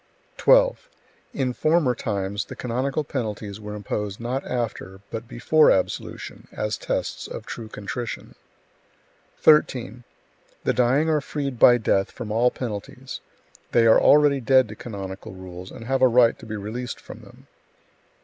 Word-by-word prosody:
12. - - +4 0.4
In 130 -3 -1
former 155 -2 +2
times 100 -2 -3
the - - -9
canonical 130 +5 -2
penalties 105 -7 -4
were 105 0 -7
imposed 105 -1 -4
not 125 +4 -3
after, 110 -6 -4
but 115 +1 -5
before 155 +7 +4
absolution, 95 - -2
as 105 -1 -2
tests - - -3
of - - -7
true 115 - -7
contrition. 115 +3 -6 1.0
13. 125 -5 +3 0.6
The - - +1
dying 130 +5 +2
are 155 -2 +2
freed 140 -4 -4
by 120 - +8
death 100 -4 +1
from 115 -4 -7
all 120 +3 +3
penalties; 110 -6 -6 0.5
they 115 -1 +5
are 110 - +6
already 145 -2 +5
dead 130 0 +4
to 110 - -8
canonical 95 -4 -7
rules, 90 0 -9
and 115 - -10
have 135 +1 0
a 130 - +7
right 120 -1 +4
to 115 - -11
be 110 - -4
released 110 +5 -5
from - - -11
them. - - -17
120 Hz, 150 wpm, -24 LUFS, 105-130 Hz, 1.0 s, by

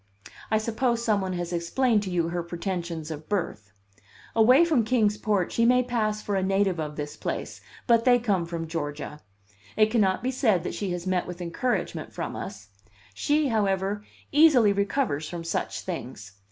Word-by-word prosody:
I 220 - +3
suppose 235 +2 0
some 210 -3 +2
one 190 -1 -2
has 175 0 -3
explained 210 +7 +1
to 200 - -4
you 170 -2 0
her 175 0 -2
pretensions 170 -2 -4
of 155 0 -8
birth. 110 - -3 0.6
Away 250 +8 +6
from 305 -9 +2
Kings 220 -2 +2
Port 205 -4 0
she 230 - +1
may 250 +2 +5
pass 215 -3 -1
for 205 - -2
a 190 - +1
native 195 -2 +1
of 150 -1 -4
this 150 -1 -5
place, - - -5 0.2
but 230 -2 +4
they 245 0 +6
come 200 -8 0
from 170 -1 -4
Georgia. 150 -2 -5 0.6
It 215 0 +4
cannot 200 -3 +2
be 255 - 0
said 220 - +2
that - - -4
she 200 - -3
has 175 0 -5
met 185 -1 0
with 180 0 -7
encouragement 180 +9 -2
from - - -4
us; 195 - -7 0.4
she, 290 - +1
however, 200 -2 0 0.3
easily 280 -9 +6
recovers 200 - -1
from 170 -1 -5
such 165 - -2
things. 125 - -6
195 Hz, 180 wpm, -26 LUFS, 170-230 Hz, 0.6 s, Away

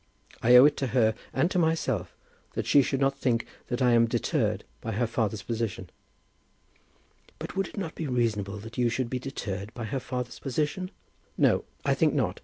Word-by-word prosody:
I 120 +2 +6
owe 125 +2 +10
it 150 - +3
to 135 - -1
her 110 -2 +4 0.2
and 175 - +1
to 180 - +2
myself 135 - 0 0.4
that - - -2
she 145 - +6
should 135 0 -1
not 135 0 +1
think 115 -2 +1 0.2
that 120 +2 -1
I 125 - +5
am 115 0 +5
deterred - - 0 0.2
by 110 - -3
her 120 +4 +1
father's 110 -3 -1
position." 110 -7 -3 1.5
"But - - -7
would 195 -1 0
it - - -13
not 180 -5 -3
be 160 - -4
reasonable 110 -5 0
that 115 +3 -8
you 120 -1 +3
should 115 +1 -2
be 130 - -1
deterred 105 -6 -5
by 120 - -5
her 135 +5 -2
father's 125 -1 -5
position?" 150 +7 -2 0.5
"No, - - +3 0.2
I - - +3
think - - +2
not. - - 0
125 Hz, 195 wpm, -28 LUFS, 115-135 Hz, 1.5 s, owe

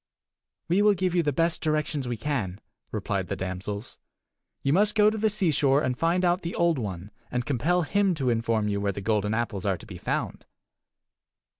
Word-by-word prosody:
"We 180 +5 +3
will 210 -1 +5
give 185 -1 0
you 175 - +3
the 150 -3 +1
best 165 +4 0
directions 150 -3 -1
we 120 -1 -2
can," 110 -8 -2 0.3
replied 100 -3 -2
the 100 - -2
damsels. 95 +4 -5 0.6
"You 140 - +2
must 210 +4 +3
go 210 0 +5
to 220 - -3
the 220 +1 +3
seashore 155 -8 +2
and 125 -3 0
find 170 +6 +1
out 175 +1 +2
the 170 - -4
Old 170 -4 +2
One, 95 -2 -5 0.2
and 125 -1 -2
compel 165 +7 +1
him 195 +2 +2
to 130 -5 0
inform 115 -2 0
you 100 -1 -1
where 100 0 +1
the 100 - -6
golden 105 0 0
apples 115 -5 -2
are 95 -2 +1
to - - -13
be 95 -5 -9
found." - - -3
135 Hz, 195 wpm, -27 LUFS, 105-175 Hz, 0.6 s, will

